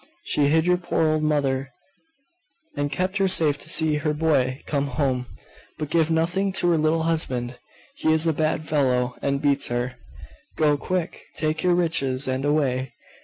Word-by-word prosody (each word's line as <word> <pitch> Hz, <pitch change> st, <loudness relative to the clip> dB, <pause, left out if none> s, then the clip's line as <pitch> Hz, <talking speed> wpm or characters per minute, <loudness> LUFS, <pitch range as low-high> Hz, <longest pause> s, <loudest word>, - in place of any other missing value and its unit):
She 145 Hz, -, +1 dB
hid 160 Hz, +2 st, +3 dB
your 180 Hz, 0 st, +3 dB
poor 175 Hz, -2 st, 0 dB
old 155 Hz, 0 st, 0 dB
mother, 140 Hz, -3 st, 0 dB, 1.1 s
and 145 Hz, -1 st, -2 dB
kept 185 Hz, +6 st, -1 dB
her 195 Hz, -1 st, +2 dB
safe 155 Hz, -6 st, +2 dB
to -, -, -3 dB
see 155 Hz, -2 st, +2 dB
her 150 Hz, 0 st, -1 dB
boy 140 Hz, -5 st, +1 dB
come 140 Hz, -1 st, -1 dB
home. 130 Hz, -2 st, -1 dB, 0.5 s
But 155 Hz, -1 st, -5 dB
give 165 Hz, -1 st, +2 dB
nothing 175 Hz, +5 st, +1 dB
to 175 Hz, -, +2 dB
her 165 Hz, -, +3 dB
little 160 Hz, +1 st, +1 dB
husband: 130 Hz, -7 st, -1 dB, 0.4 s
he 160 Hz, -, +1 dB
is 160 Hz, +1 st, +3 dB
a 165 Hz, -, +2 dB
bad 155 Hz, +1 st, -1 dB
fellow, 125 Hz, -4 st, +1 dB
and 140 Hz, 0 st, 0 dB
beats 140 Hz, -1 st, +2 dB
her. 120 Hz, +1 st, -3 dB, 0.6 s
Go, 150 Hz, -2 st, +3 dB
quick! 180 Hz, +3 st, -3 dB
take 155 Hz, 0 st, -1 dB
your 180 Hz, -1 st, +3 dB
riches, 140 Hz, -6 st, 0 dB
and 130 Hz, +1 st, -1 dB
away!.... 135 Hz, -4 st, 0 dB
150 Hz, 170 wpm, -24 LUFS, 135-160 Hz, 1.1 s, hid